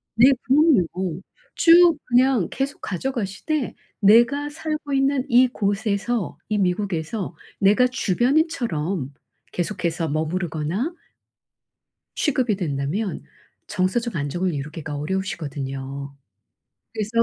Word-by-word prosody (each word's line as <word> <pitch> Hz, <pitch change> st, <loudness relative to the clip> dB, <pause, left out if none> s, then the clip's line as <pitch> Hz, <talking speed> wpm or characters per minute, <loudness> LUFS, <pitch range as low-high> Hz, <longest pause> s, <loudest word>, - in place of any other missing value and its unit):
네. 250 Hz, +5 st, +7 dB
부모님 270 Hz, -, +4 dB
어. 180 Hz, -3 st, -3 dB, 0.4 s
쭉 340 Hz, 0 st, +6 dB
그냥 250 Hz, -6 st, +3 dB
계속 275 Hz, +1 st, -3 dB
가져가시되 240 Hz, -, -3 dB, 0.2 s
내가 240 Hz, +8 st, +4 dB
살고 305 Hz, -2 st, -4 dB
있는 270 Hz, -1 st, +2 dB
이곳에서 220 Hz, -3 st, +1 dB
이 210 Hz, -, +1 dB
미국에서 180 Hz, -1 st, -2 dB, 0.2 s
내가 210 Hz, +6 st, +4 dB
주변인처럼 230 Hz, -, 0 dB, 0.4 s
계속해서 170 Hz, -3 st, -2 dB
머무르거나 160 Hz, -, -2 dB, 1.2 s
취급이 260 Hz, -8 st, +1 dB
된다면 170 Hz, +4 st, -2 dB, 0.5 s
정서적 205 Hz, +3 st, -1 dB
안정을 170 Hz, +5 st, -1 dB
이루기가 150 Hz, +1 st, -5 dB
어려우시거든요. 140 Hz, -5 st, -4 dB, 0.8 s
그래서 215 Hz, -1 st, -3 dB
200 Hz, 250 characters per minute, -23 LUFS, 165-255 Hz, 1.2 s, 네